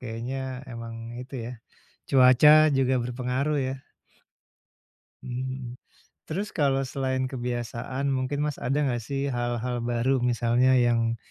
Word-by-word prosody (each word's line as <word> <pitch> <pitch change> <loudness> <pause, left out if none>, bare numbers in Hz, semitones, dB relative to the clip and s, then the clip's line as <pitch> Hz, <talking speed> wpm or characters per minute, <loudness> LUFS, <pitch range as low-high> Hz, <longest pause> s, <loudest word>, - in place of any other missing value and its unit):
kayaknya 120 +2 -5 0.4
emang 115 -1 -7 0.3
itu 125 +2 -10
ya, 120 - -6 0.6
cuaca 130 +2 +7 0.2
juga 130 -1 +2
berpengaruh 125 +4 -1
ya. 130 - -2 1.5
Mhm. 130 0 -5 0.5
Terus 195 +6 -4
kalau 135 -5 +2
selain 130 -1 -1
kebiasaan 125 +1 -3
mungkin 135 +1 -1
Mas, 150 -2 -2
ada 125 +4 0
nggak 120 -3 -1
sih 140 +4 -2
hal-hal 120 -1 -2
baru 120 +2 +1
misalnya 120 +1 +2
yang 115 -1 +2
125 Hz, 115 wpm, -26 LUFS, 120-135 Hz, 1.5 s, cuaca